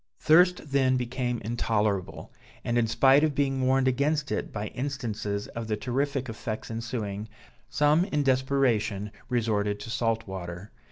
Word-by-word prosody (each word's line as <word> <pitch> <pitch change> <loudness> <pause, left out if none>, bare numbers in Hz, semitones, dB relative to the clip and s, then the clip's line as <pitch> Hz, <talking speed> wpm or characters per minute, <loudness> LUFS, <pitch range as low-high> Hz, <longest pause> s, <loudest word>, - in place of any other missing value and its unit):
Thirst 175 -1 +4
then 130 -2 +3
became 125 -1 -2
intolerable; 105 -4 -1 0.3
and 120 - 0
in 120 -1 +3
spite 135 +6 +5
of 155 -3 +1
being 135 -1 +1
warned 130 0 +3
against 140 +3 +1
it - - -2
by 105 0 -4
instances 110 -7 -3
of 115 -1 -6
the 110 -1 -1
terrific 135 +4 -1
effects 110 -1 -5
ensuing, 110 -3 -4 0.4
some 150 +4 +3
in 150 -7 0
desperation 130 -6 +1 0.2
resorted 105 -4 0
to 115 - -7
salt 115 -1 0
water. 90 +1 -7
120 Hz, 145 wpm, -27 LUFS, 110-135 Hz, 0.4 s, spite